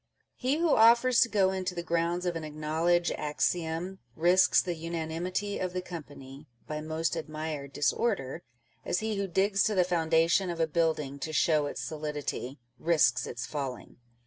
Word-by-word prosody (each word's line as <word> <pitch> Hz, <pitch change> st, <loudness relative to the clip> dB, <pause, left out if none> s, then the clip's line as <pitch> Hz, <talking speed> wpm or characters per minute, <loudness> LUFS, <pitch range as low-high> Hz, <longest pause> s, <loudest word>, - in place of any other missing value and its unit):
He 265 Hz, +4 st, 0 dB
who 330 Hz, -2 st, +3 dB
offers 235 Hz, +2 st, +6 dB
to 235 Hz, -, +4 dB
go 195 Hz, -3 st, +3 dB
into 185 Hz, -1 st, -3 dB
the 170 Hz, -, -3 dB
grounds 170 Hz, +1 st, 0 dB
of 175 Hz, -1 st, -1 dB
an 165 Hz, -, -4 dB
acknowledged 160 Hz, +3 st, 0 dB
axiom, 165 Hz, +4 st, -1 dB, 0.2 s
risks 175 Hz, +3 st, +5 dB
the 180 Hz, -, -1 dB
unanimity 170 Hz, +4 st, -3 dB
of 185 Hz, -1 st, -2 dB
the 185 Hz, -, -2 dB
company 145 Hz, -4 st, -10 dB
" -, -, -37 dB
by 150 Hz, 0 st, -4 dB
most 160 Hz, +2 st, -2 dB
admired 155 Hz, -3 st, -5 dB
disorder," 165 Hz, -, -1 dB, 0.4 s
as 180 Hz, -, -1 dB
he 220 Hz, -1 st, -2 dB
who 200 Hz, 0 st, -1 dB
digs 195 Hz, +3 st, +1 dB
to 215 Hz, -, +1 dB
the 185 Hz, -, +4 dB
foundation 170 Hz, +1 st, +2 dB
of 170 Hz, -1 st, -4 dB
a 165 Hz, -, +3 dB
building 155 Hz, -4 st, -1 dB
to 155 Hz, -, -4 dB
show 155 Hz, -1 st, +2 dB
its -, -, -5 dB
solidity, 150 Hz, -3 st, -4 dB, 0.2 s
risks 155 Hz, -7 st, +2 dB
its 120 Hz, 0 st, -5 dB
falling. 135 Hz, -3 st, -6 dB
165 Hz, 170 wpm, -29 LUFS, 155-185 Hz, 0.4 s, offers